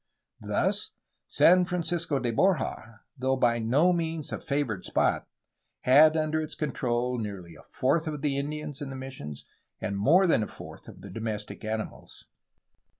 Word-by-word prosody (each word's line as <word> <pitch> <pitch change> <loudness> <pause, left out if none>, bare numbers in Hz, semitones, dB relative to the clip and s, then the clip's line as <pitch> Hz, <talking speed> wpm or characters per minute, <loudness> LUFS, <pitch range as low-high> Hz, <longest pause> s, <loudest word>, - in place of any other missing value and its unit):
Thus, - - -1 0.3
San 180 +1 +5
Francisco 170 -3 -1
de 120 -3 -1
Borja, 125 - 0
though 130 0 0
by 120 -2 +2
no 140 +11 +3
means 165 -3 -2
a - - -3
favored 140 -10 -2
spot, - - 0 0.5
had 155 +5 +6
under 155 0 0
its 155 0 -4
control 125 -4 -1
nearly 100 -6 -6
a - - -14
fourth 155 +5 0
of 150 -2 -4
the 145 -2 +1
Indians 150 +1 -4
in 140 - -4
the 135 - -6
missions 130 - -8 0.3
and 100 - -3
more 160 - +5
than 165 -10 +3
a 105 - -2
fourth - - -11
of - - -12
the - - -9
domestic 110 -2 -5
animals. 110 0 -5
135 Hz, 155 wpm, -28 LUFS, 115-155 Hz, 0.5 s, had